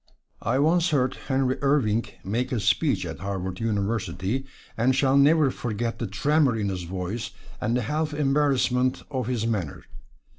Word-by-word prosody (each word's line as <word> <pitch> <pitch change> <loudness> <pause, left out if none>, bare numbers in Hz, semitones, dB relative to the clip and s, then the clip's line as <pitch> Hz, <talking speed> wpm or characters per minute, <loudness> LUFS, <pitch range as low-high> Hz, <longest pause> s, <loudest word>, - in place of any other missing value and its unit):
I - - 0
once 165 +4 +3
heard 130 -4 +1
Henry 130 -1 +1
Irving 125 -6 +2 0.2
make 120 +7 -2
a 125 - 0
speech 100 - +1
at 80 -2 -6
Harvard 95 -1 -4
University, 110 +2 -1 0.3
and 125 +3 +2
shall 135 0 +3
never 145 0 +5
forget 115 -1 -3
the 115 - -2
tremor 140 +6 +2
in 105 -2 -1
his 90 -2 -4
voice 95 +5 -4 0.3
and 120 - +1
the 125 - -1
half 155 +6 -1
embarrassment 135 -3 +1
of 130 -4 -2
his 120 -3 -1
manner. 100 -10 -2
125 Hz, 155 wpm, -25 LUFS, 105-140 Hz, 0.3 s, never